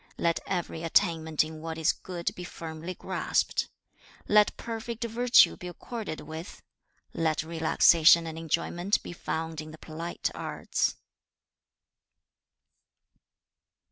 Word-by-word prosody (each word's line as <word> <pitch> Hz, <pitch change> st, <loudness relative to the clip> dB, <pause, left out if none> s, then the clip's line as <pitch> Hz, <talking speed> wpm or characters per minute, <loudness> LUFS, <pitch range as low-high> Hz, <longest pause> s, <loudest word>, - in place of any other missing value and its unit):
2. -, -, -6 dB
'Let 170 Hz, -1 st, +2 dB
every 175 Hz, -3 st, -2 dB
attainment 160 Hz, -1 st, +2 dB
in 155 Hz, 0 st, -8 dB
what 160 Hz, 0 st, -5 dB
is 160 Hz, -1 st, +3 dB
good 175 Hz, -2 st, -4 dB
be 180 Hz, -, -8 dB
firmly 165 Hz, 0 st, -7 dB
grasped. -, -, -1 dB, 0.6 s
3. -, -, -4 dB
'Let 210 Hz, -1 st, +5 dB
perfect 230 Hz, +1 st, -5 dB
virtue 240 Hz, +2 st, +5 dB
be 180 Hz, -, -8 dB
accorded 190 Hz, -1 st, -6 dB
with. 160 Hz, +3 st, -8 dB, 0.5 s
4. -, -, -4 dB
'Let 155 Hz, -1 st, +1 dB
relaxation 165 Hz, +1 st, +5 dB
and 160 Hz, -1 st, -5 dB
enjoyment 170 Hz, +4 st, -1 dB
be -, -, -7 dB
found 160 Hz, -2 st, -4 dB
in 155 Hz, -, -9 dB
the 155 Hz, -, -11 dB
polite 165 Hz, +2 st, -4 dB
arts.' -, -, -1 dB
165 Hz, 125 wpm, -28 LUFS, 160-180 Hz, 0.6 s, Let